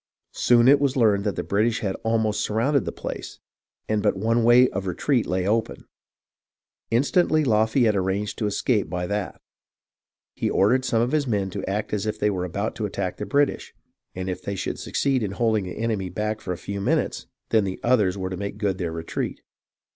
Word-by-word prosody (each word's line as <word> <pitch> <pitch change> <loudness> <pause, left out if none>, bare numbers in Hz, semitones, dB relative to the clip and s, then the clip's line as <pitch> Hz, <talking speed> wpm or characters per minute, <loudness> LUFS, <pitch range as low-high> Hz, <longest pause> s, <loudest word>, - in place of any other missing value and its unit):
Soon 120 0 +4
it 140 +1 +7
was 140 -1 +1
learned 105 -4 +3
that 105 - 0
the - - -3
British 110 +3 +1
had 95 -3 -1
almost 110 -2 +1
sur 105 - -2
rounded 135 +4 +2
the - - -2
place, - - -7 0.5
and 110 -1 0
but 105 -1 +2
one 115 +3 +1
way 120 +2 +6
of 95 -1 -4
retreat 120 - 0
lay 90 +1 -1
open. 110 +1 -1 1.0
Instantly 155 +6 +2
Lafayette 110 -1 +3
arranged 95 +2 -1
to 105 - 0
escape 105 +1 0
by 90 0 -2
that. 100 +1 -3 0.9
He - - -1
ordered 125 +7 +3
some 115 -2 +2
of 125 - -1
his 150 -2 +1
men 100 -4 -1
to - - -5
act 105 +2 -2
as 105 0 -1
if 110 - -2
they 105 - +1
were 90 -2 -2
about 100 +5 -3
to 105 - -1
attack 95 -2 -4
the - - -5
British, 145 0 0 0.4
and 95 0 -4
if 90 - -3
they 100 - -4
should - - -4
succeed 135 -3 0
in 100 -3 -2
holding 110 -2 +1
the 90 - -7
enemy 110 -5 -1
back 105 +4 -3
for 90 - -4
a 90 - -3
few 100 +2 -5
minutes, - - 0 0.2
then 110 -2 +3
the 95 -1 -4
others 105 -6 +2
were 95 -1 -3
to 95 - -4
make 100 +1 -5
good 100 -3 -1
their 85 -3 -2
retreat. 80 0 -4
105 Hz, 205 wpm, -24 LUFS, 95-120 Hz, 1.0 s, it